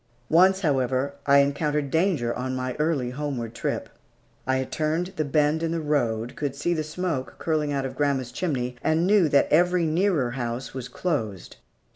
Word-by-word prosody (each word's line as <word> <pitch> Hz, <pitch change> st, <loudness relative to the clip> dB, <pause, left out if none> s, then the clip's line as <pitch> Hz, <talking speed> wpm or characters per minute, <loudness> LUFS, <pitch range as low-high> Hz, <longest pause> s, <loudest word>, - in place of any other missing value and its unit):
Once, 190 Hz, +4 st, +5 dB
however, 135 Hz, -3 st, 0 dB
I 140 Hz, 0 st, +6 dB
encountered 145 Hz, 0 st, 0 dB
danger 160 Hz, -9 st, +1 dB
on 130 Hz, +1 st, -3 dB
my 130 Hz, 0 st, -2 dB
early 150 Hz, -6 st, 0 dB
homeward 130 Hz, -5 st, -4 dB
trip. -, -, -3 dB, 0.6 s
I 130 Hz, -, +2 dB
had 130 Hz, -1 st, -3 dB
turned 160 Hz, +4 st, -1 dB
the 155 Hz, -, 0 dB
bend 150 Hz, +2 st, +1 dB
in 165 Hz, -, 0 dB
the 165 Hz, -, -1 dB
road, 120 Hz, -7 st, -1 dB
could 140 Hz, -2 st, -3 dB
see 175 Hz, +5 st, 0 dB
the 155 Hz, -2 st, -1 dB
smoke 155 Hz, -3 st, -3 dB
curling 155 Hz, -2 st, 0 dB
out 135 Hz, -1 st, -1 dB
of 135 Hz, -, -5 dB
grandma's 140 Hz, -4 st, 0 dB
chimney, 125 Hz, -5 st, -2 dB
and 160 Hz, +2 st, +2 dB
knew 195 Hz, -4 st, +4 dB
that 140 Hz, -, +4 dB
every 175 Hz, +2 st, +4 dB
nearer 160 Hz, -6 st, +1 dB
house 120 Hz, 0 st, -4 dB
was 130 Hz, -2 st, -5 dB
closed. 120 Hz, -, -3 dB
145 Hz, 175 wpm, -25 LUFS, 130-160 Hz, 0.6 s, I